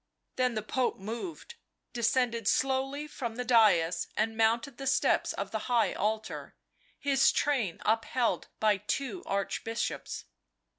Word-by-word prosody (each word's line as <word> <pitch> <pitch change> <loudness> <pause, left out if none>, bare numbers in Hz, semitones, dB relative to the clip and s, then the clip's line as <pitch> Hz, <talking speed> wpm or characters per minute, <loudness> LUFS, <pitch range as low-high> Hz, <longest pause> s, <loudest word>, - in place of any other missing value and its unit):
Then 250 -2 +1
the 215 - -2
Pope 255 +3 0
moved, 235 - -6 0.4
descended 235 -2 +1
slowly 270 +3 +1
from 240 -6 -5
the 250 +1 -3
dais 195 -8 +4
and 225 +1 +1
mounted 230 +3 +1
the 270 - -4
steps - - +2
of - - -4
the - - -1
high 240 -2 +3
altar, 215 +2 -3 0.4
his 275 -2 +3
train 250 - 0
upheld 225 +2 +1
by 215 -2 +3
two 275 - -3
Archbishops. 200 +3 -3
235 Hz, 130 wpm, -30 LUFS, 220-265 Hz, 0.4 s, dais